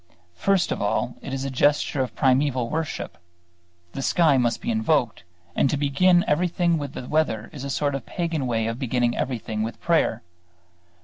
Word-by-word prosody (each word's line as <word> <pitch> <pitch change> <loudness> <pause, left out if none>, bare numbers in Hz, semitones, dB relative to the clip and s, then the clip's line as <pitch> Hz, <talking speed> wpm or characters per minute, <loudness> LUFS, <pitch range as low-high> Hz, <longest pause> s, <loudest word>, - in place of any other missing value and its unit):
First 195 - +1
of - - -2
all 110 +4 0
it 135 - -7
is 135 0 -3
a 135 - -3
gesture 145 +1 +2
of 130 - -3
primeval 130 -2 +2
worship. 160 -1 -4 0.7
The 135 - -5
sky 160 0 +3
must 120 -3 +1
be 235 - -2
invoked; 160 - +1 0.3
and 135 - +3
to 145 - 0
begin 175 +6 +3
everything 170 +1 +1
with 145 -2 -5
the 125 - -7
weather 120 -9 0
is 140 - -7
a 140 - -4
sort 145 +1 0
of 135 -3 -5
pagan 165 -6 -2
way 115 -2 0
of 115 +2 -3
beginning 125 -2 0
everything 115 -4 -3
with 110 +2 -4
prayer. 160 -9 +1
135 Hz, 180 wpm, -24 LUFS, 125-160 Hz, 0.7 s, sky